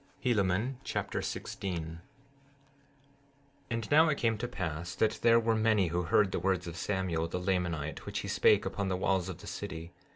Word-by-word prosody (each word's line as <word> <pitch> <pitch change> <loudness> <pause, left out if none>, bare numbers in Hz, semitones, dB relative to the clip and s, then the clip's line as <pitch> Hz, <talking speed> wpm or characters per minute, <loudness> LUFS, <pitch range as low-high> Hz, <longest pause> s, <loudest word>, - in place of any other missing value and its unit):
Helaman 110 +1 +1
Chapter - - -2
16 95 -2 -4
16:1 80 +1 -8 1.7
And 115 -2 -3
now, 155 +2 +6
it 145 - +1
came 115 -1 +2
to 120 - -2
pass 90 -6 -4
that 110 0 +1
there 115 0 +6
were 115 0 +2
many 110 -4 +3
who 85 +2 0
heard 95 +3 +3
the - - -1
words 95 0 0
of 85 -1 -6
Samuel, 90 -3 -1
the 85 - -3
Lamanite, 90 -5 -1
which - - -2
he - - -6
spake - - +4
upon 100 - -2
the 95 -1 0
walls 95 -1 +1
of 90 - -5
the - - -11
city. 80 +1 -6
95 Hz, 185 wpm, -31 LUFS, 85-110 Hz, 1.7 s, now